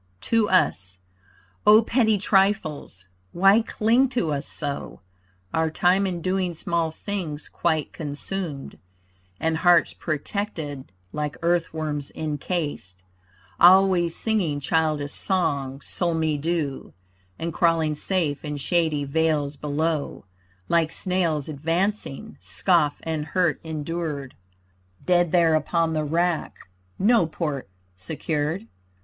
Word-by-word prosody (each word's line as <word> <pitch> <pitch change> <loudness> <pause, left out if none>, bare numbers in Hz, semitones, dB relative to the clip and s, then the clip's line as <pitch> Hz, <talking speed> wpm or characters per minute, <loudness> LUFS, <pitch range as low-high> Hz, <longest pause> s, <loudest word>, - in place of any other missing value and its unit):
TO 225 - +1
US 95 - +2 0.7
O 215 +2 +8
petty 225 -2 +2
trifles! 185 - 0 0.2
Why 195 +5 +5
cling 235 +4 +2
to 185 - 0
us 140 0 -3
so? 145 -8 -5 0.5
Our 160 0 +1
time 185 +4 +2
in 175 -3 -4
doing 185 -2 -1
small 170 0 -1
things 160 -3 -5
quite 160 -3 -1
consumed, 150 0 -4 0.6
And 160 0 0
hearts 175 0 +4
protected 155 - -4 0.2
like 150 -1 -3
earth 170 0 +1
worms 150 -3 -3
encased, 145 - -4 0.6
Always 180 -2 +5
singing 190 -10 0
childish 155 -1 0
songs, 140 -8 -1
sol 170 -2 -1
me 160 -1 0
do, 150 -2 -3 0.4
And 165 0 -4
crawling 165 -2 +2
safe 150 -2 -1
in 150 -1 -4
shady 155 0 +1
vales 150 -1 0
below, 150 -1 -2 0.4
Like 165 -2 +2
snails 170 -7 0
advancing, 165 +2 -2
scoff 145 - +1
and 160 -2 -2
hurt 165 0 0
endured, 155 -3 -4 0.7
Dead 175 -2 +3
there 170 -2 +4
upon 165 +1 +1
the 155 -1 0
rack, 170 +2 0 0.4
no 215 -3 +4
port 150 - -4 0.3
secured. 150 - -3
160 Hz, 110 wpm, -24 LUFS, 150-180 Hz, 0.7 s, O